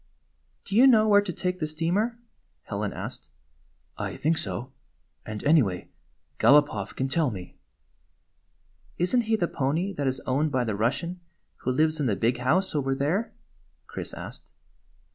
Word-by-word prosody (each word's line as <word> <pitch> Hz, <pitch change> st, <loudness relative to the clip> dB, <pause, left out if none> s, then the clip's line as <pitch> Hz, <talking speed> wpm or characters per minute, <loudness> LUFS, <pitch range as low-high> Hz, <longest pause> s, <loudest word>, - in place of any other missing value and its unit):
"Do 195 Hz, -, -4 dB
you 250 Hz, +5 st, +8 dB
know 220 Hz, -4 st, +6 dB
where 205 Hz, -1 st, +6 dB
to 200 Hz, -3 st, -4 dB
take 180 Hz, +1 st, -2 dB
the 155 Hz, -, -1 dB
steamer?" 175 Hz, +10 st, 0 dB, 0.5 s
Helen -, -, -3 dB
asked. 65 Hz, -, -6 dB, 0.4 s
" -, -, -41 dB
I -, -, -8 dB
think 160 Hz, +2 st, +1 dB
so. 100 Hz, +7 st, -5 dB, 0.6 s
And 110 Hz, -1 st, -5 dB
anyway, 130 Hz, -, +2 dB, 0.5 s
Galopoff 140 Hz, -9 st, +4 dB
can 130 Hz, -, -1 dB
tell 155 Hz, +1 st, +1 dB
me." 95 Hz, -5 st, -8 dB, 0.7 s
" -, -, -38 dB
Is 180 Hz, +7 st, +1 dB
n't 240 Hz, -2 st, +3 dB
he 220 Hz, +1 st, +2 dB
the 175 Hz, -5 st, 0 dB
pony 160 Hz, +10 st, -1 dB
that 140 Hz, -5 st, -2 dB
is 130 Hz, 0 st, -1 dB
owned 145 Hz, +4 st, 0 dB
by 130 Hz, -2 st, +1 dB
the 110 Hz, -3 st, -1 dB
Bus 115 Hz, +6 st, +1 dB
sian 175 Hz, +1 st, -6 dB, 0.4 s
who 130 Hz, -, -2 dB
lives 155 Hz, +4 st, +2 dB
in 145 Hz, -, +1 dB
the 105 Hz, -, +1 dB
big 115 Hz, +5 st, +1 dB
house 175 Hz, +10 st, +1 dB
over 135 Hz, -3 st, 0 dB
there?" 160 Hz, +12 st, 0 dB, 0.5 s
Chris -, -, -6 dB
asked. -, -, -9 dB
150 Hz, 170 wpm, -27 LUFS, 130-180 Hz, 0.7 s, you